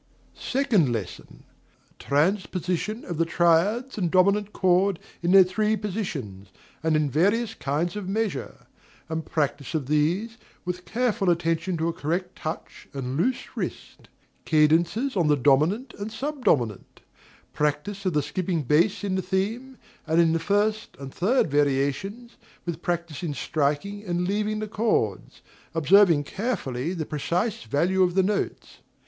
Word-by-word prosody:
Second 240 - +1
Lesson. 110 -6 -6 0.6
Transposition 185 - -1
of 175 - -5
the - - +5
triads 180 +10 +2
and 175 -3 +1
dominant 200 +3 +3
chord 185 0 +2 0.2
in 170 +1 +1
their 195 0 +9
three 215 +4 0
positions, 145 - -5 0.3
and 160 -1 +1
in 155 -1 +2
various 205 - +1
kinds 155 +6 -2
of 200 -3 -5
measure; 215 0 -3 0.4
and 160 0 -3
practice 145 -1 -2
of 150 -4 -1
these, 175 - 0 0.3
with 180 0 -4
careful 225 -4 0
attention 170 +1 0
to 160 +1 0
a 170 - -1
correct 175 +4 -3
touch 160 +1 -7
and 130 -1 -3
loose 240 - -1
wrist; - - -6 0.3
cadences 165 - +2
on 175 -5 +2
the 150 - +4
dominant 155 - +2
and 205 +2 -4
sub 275 +4 -5
dominant; 115 - 0 0.5
practice 150 +7 -1
of 185 -3 0
the 150 -1 +1
skipping 165 +2 -2
bass 165 - +2
in 200 -2 -1
the 190 - 0
theme, 215 +8 -2 0.3
and 160 +1 +2
in 165 -1 +4
the 165 - +1
first 205 +5 0
and 135 -1 -8
third 200 - +1
variations, 145 - 0 0.3
with 170 -1 -4
practice 170 -4 -3
in 160 -5 -3
striking 155 +10 -1
and 180 -2 -1
leaving 210 +2 0
the 215 0 -3
chords, 205 - -1 0.3
observing 165 -1 +5
carefully 155 - -3
the 165 -4 -3
precise 180 +10 -1
value 180 +7 +1
of 180 -1 +3
the 190 - +4
notes. 205 +2 -3
180 Hz, 145 wpm, -25 LUFS, 155-205 Hz, 0.6 s, their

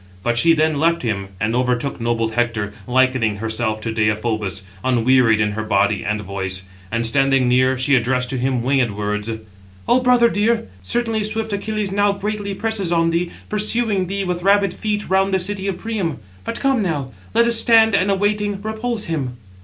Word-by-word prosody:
But 120 0 0
she 165 +8 +5
then 155 -2 +1
left 165 0 +1
him, 100 -5 -2
and 110 +2 0
overtook 125 +1 -1
noble 115 -1 0
Hector, 110 -3 -1
likening 130 -4 +2
herself 110 0 -2
to 115 0 -3
Deïphobus, 110 -3 -1 0.2
unwearied 125 -2 +3
in 105 -2 +1
her 110 +1 -3
body 105 -1 +1
and 105 0 -1
voice; 95 -1 -3 0.3
and, 115 +1 0
standing 135 +1 +3
near, 130 +1 +3
she 130 +3 +1
addressed 125 +1 +1
to 135 - -2
him 130 -1 0
winged 130 -2 +2
words: 105 +1 -2 0.6
"O 250 - +4
brother 250 -2 +4
dear, 225 +1 0
certainly 225 - -1
swift 220 0 -2
Achilles 210 0 -2
now 205 0 +2
greatly 205 0 -4
presses 215 -5 -1
on 165 -1 +2
thee, 170 +1 0 0.2
pursuing 210 -2 +1
thee 195 +2 -2
with 180 -1 -3
rapid 200 0 +3
feet 210 -1 -3
round 190 +1 +2
the 190 - +3
city 195 +1 -2
of 190 -2 -2
Priam. 195 -7 -3 0.3
But - - -3
come 270 -4 +1
now, 145 -9 -2 0.2
let 235 +1 +5
us 235 -1 +3
stand, 225 -2 +5
and, 200 0 +2
awaiting, 205 0 0
repulse 220 +1 -3
him." 135 -7 -3
150 Hz, 180 wpm, -20 LUFS, -, 0.6 s, she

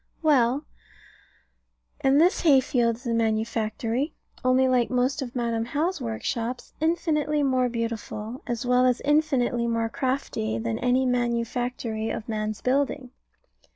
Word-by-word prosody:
Well, 275 -1 +3 1.3
and 270 +2 +3
this 350 +4 +4
hay 285 -5 +6
field 245 -4 +1
is 245 +4 -17
a 235 - 0
manufactory: 225 +4 -1 0.3
only 255 +1 +4
like 250 -2 +2
most 255 +4 0
of 250 -2 -6
Madam 235 -2 0
How's 305 +7 -1
workshops, 235 +1 -3
infinitely 300 -2 +1
more 255 -2 +2
beautiful, 230 +1 -4
as 240 -1 -3
well 250 +1 +4
as 250 -1 +2
infinitely 270 -6 +1
more 230 -1 0
crafty, 255 - -2
than 115 0 -2
any 255 +1 +2
manufactory 240 -2 -1
of 220 - -4
man's 215 -1 -3
building. 265 -1 0
245 Hz, 130 wpm, -25 LUFS, 230-270 Hz, 1.3 s, hay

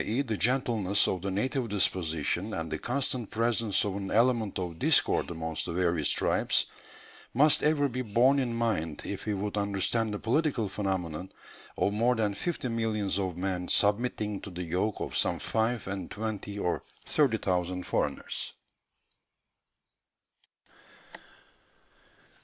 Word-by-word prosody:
e. 120 +6 0
the 110 -5 -2
gentleness 115 -5 +2
of 95 - -1
the 100 - -2
native 120 +5 -1
disposition 90 0 0
and 80 -1 -4
the - - -2
constant 125 -3 -1
presence 115 -2 +1
of 100 -2 -2
an 100 -1 -4
element 115 -2 +2
of 85 -3 -4
discord - - +3
amongst 80 -1 -3
the - - -3
various 85 -3 +1
tribes, - - +3 0.7
must 150 +4 +6
ever 150 -1 +3
be 130 -1 -3
borne 125 +5 +3
in 125 -3 0
mind 110 -10 0
if - - -5
we 105 - +1
would 100 +1 -3
understand 105 +2 0
the 105 - -2
political 130 -1 0
phenomenon 95 -3 -3 0.5
of 100 - +1
more 120 +4 +3
than 105 -3 0
fifty 165 - -3
millions 110 -4 -1
of 95 -3 -2
men 90 -1 -2
submitting 105 -1 +1
to - - -8
the 90 -1 -5
yoke 90 +5 -1
of - - -4
some - - +2
five 115 +1 -1
and 95 -2 -4
twenty 105 -1 -4
or 90 -3 -1 0.2
thirty 135 -7 +2
thousand 90 -2 -1
foreigners." - - -2
105 Hz, 140 wpm, -29 LUFS, 95-115 Hz, 0.7 s, must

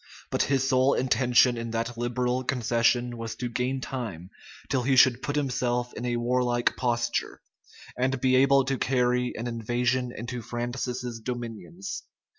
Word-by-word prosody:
But - - +1
his 135 -1 +1
sole 130 +1 +3
intention 125 -1 +3
in 115 0 -4
that 115 +1 -2
liberal 125 +1 -1
concession 120 0 +1
was 115 -1 -5
to 125 - -3
gain 125 +2 -2
time 105 -11 -5 0.4
till 135 -2 +1
he 135 +2 +2
should 125 -1 +6
put 145 - -3
himself 125 -3 -1
in 120 - -5
a 120 -1 0
warlike 120 0 +1
posture, 120 -2 -1 0.6
and 130 +1 0
be 130 0 +3
able 135 0 +5
to 135 -1 -1
carry 125 -1 +1
an 115 - -4
invasion 120 +2 -1
into 120 +1 -5
Francis's 120 +1 -4
dominions. 120 - -6
125 Hz, 150 wpm, -27 LUFS, 120-130 Hz, 0.6 s, should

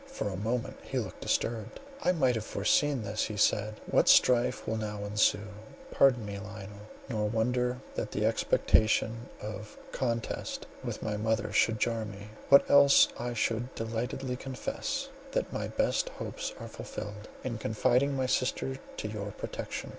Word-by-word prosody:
For 270 - -3
a 95 - -4
moment 115 +5 -2
he - - -4
looked - - -4
disturbed—"I 180 - -1
might 135 -8 +3
have 110 -2 -2
foreseen 130 +6 +1
this," 105 +1 -1
he 105 -1 -5
said, 105 +1 +2
"what - - +3
strife 120 -3 +5
will 110 - 0
now 105 -1 -4
ensue! 105 0 +2 0.4
Pardon 125 -5 +4
me, 100 -1 -5
Lionel, 105 0 -9 0.2
nor 105 -5 -1
wonder 125 +3 +1 0.2
that - - -3
the - - 0
expectation 110 +2 +2
of 105 0 -7
contest 115 -3 -2 0.2
with - - -4
my 105 -1 -1
mother 105 -1 0
should 110 +1 +3
jar 115 0 0
me, 105 -1 -8 0.2
when 140 0 +9
else 140 0 +7
I 120 0 -3
should 115 +3 -1
delightedly 125 +3 -3
confess 130 -2 -3 0.2
that - - -1
my - - -2
best - - 0
hopes - - -5
are - - -6
fulfilled, 105 +1 -7 0.2
in 120 -3 -3
confiding 125 +6 +2
my 130 - +1
sister 130 +1 0 0.2
to - - -3
your 105 -1 -4
protection. - - -5
110 Hz, 155 wpm, -30 LUFS, 105-125 Hz, 0.4 s, when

